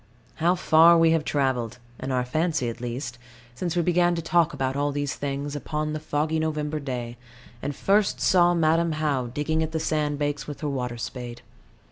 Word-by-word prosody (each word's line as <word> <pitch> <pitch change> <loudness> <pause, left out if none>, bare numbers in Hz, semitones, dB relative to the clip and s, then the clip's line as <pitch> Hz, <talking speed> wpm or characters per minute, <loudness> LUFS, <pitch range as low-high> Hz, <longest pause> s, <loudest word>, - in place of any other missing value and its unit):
How 170 +3 +3
far 170 -1 +6
we 165 -1 +5
have 165 -1 +2
travelled 130 -6 -1 0.2
in 135 - -4
our 125 -1 0
fancy 155 0 0
at 115 - -8
least 120 0 -5 0.3
since 175 +6 -3
we 175 - +2
began 175 0 +3
to 165 - -2
talk 170 0 +3
about 130 -3 -2
all 145 +1 0
these 145 -1 -2
things, 140 +1 -4
upon 150 +1 -3
the 155 - -3
foggy 155 +1 -1
November 155 -1 -2
day, 120 -4 -5 0.4
and 145 - -3
first 200 +5 +2
saw 175 -1 +4
Madam 165 0 +2
How 145 -5 0
digging 150 +6 -1
at 160 0 -2
the 160 - 0
sand 150 -2 0
banks 145 0 -2
with 145 - -7
her 150 - -1
water 125 -3 -3
spade. 120 0 -6
150 Hz, 190 wpm, -25 LUFS, 135-160 Hz, 0.4 s, far